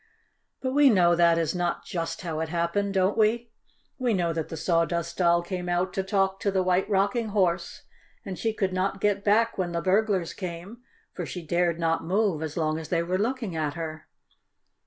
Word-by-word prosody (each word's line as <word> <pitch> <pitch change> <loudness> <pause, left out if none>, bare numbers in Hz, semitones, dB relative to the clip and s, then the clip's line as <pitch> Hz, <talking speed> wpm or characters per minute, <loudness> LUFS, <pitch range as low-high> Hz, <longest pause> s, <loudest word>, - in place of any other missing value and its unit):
But 260 0 -2
we 290 0 +6
know 175 -6 +4
that 170 -1 +4
is 165 -2 0
not 175 -1 -2
just 165 -2 -4
how 160 -3 -3
it 160 0 -2
happened, 175 +4 -1
don't 190 +2 +2
we? 225 +2 +1 0.5
We 245 -4 +1
know 170 -2 0
that 160 -1 -3
the 160 - -6
Sawdust 170 0 0
Doll 170 -1 +3
came 180 0 -4
out 175 +1 0
to 195 - 0
talk 195 0 0
to 200 - 0
the 190 -1 +1
White 185 +2 +1
Rocking 205 +4 +1
Horse, 190 -5 0 0.4
and 190 - -4
she 225 - 0
could 195 -3 -1
not 190 +1 -1
get 200 0 +1
back 220 +1 +2
when 175 -2 -1
the 170 - 0
burglars 195 -2 +1
came, 185 +5 -7 0.3
for - - -5
she 180 -3 -6
dared 170 0 +1
not 165 -1 0
move 190 -2 +1
as 160 0 -5
long 155 -1 0
as 160 - -8
they 170 -1 +1
were 180 +2 -1
looking 225 -4 -2
at 155 -1 -2
her. 160 -2 -6
185 Hz, 200 wpm, -26 LUFS, 170-200 Hz, 0.5 s, we